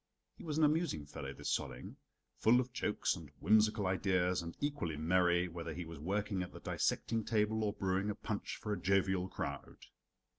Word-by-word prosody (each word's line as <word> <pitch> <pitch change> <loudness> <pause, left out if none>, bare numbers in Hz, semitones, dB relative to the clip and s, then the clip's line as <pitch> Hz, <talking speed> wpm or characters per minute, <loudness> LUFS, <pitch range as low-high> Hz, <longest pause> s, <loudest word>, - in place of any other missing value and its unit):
He - - -12
was 155 -2 -2
an 160 - +4
amusing 150 - +2
fellow, 70 -1 -6
this - - -4
Solling. 65 -1 -6 0.4
Full 120 +3 +6
of 125 -1 -2
jokes 115 -4 0
and 80 -5 -10
whimsical 105 0 +4
ideas, 95 -1 +2
and 85 0 -7
equally 145 - -2
merry, 90 +2 +3
whether 85 -2 -6
he 90 - -4
was 80 -2 -8
working 100 +3 -1
at 90 - -5
the - - -10
dissecting 115 -1 0
table 110 0 +1
or 105 -1 0
brewing 95 0 0
a 105 - -1
punch 105 -1 -4
for 105 - -3
a - - -4
jovial 95 -1 +2
crowd. 70 -5 -5
95 Hz, 185 wpm, -35 LUFS, 85-110 Hz, 0.4 s, Full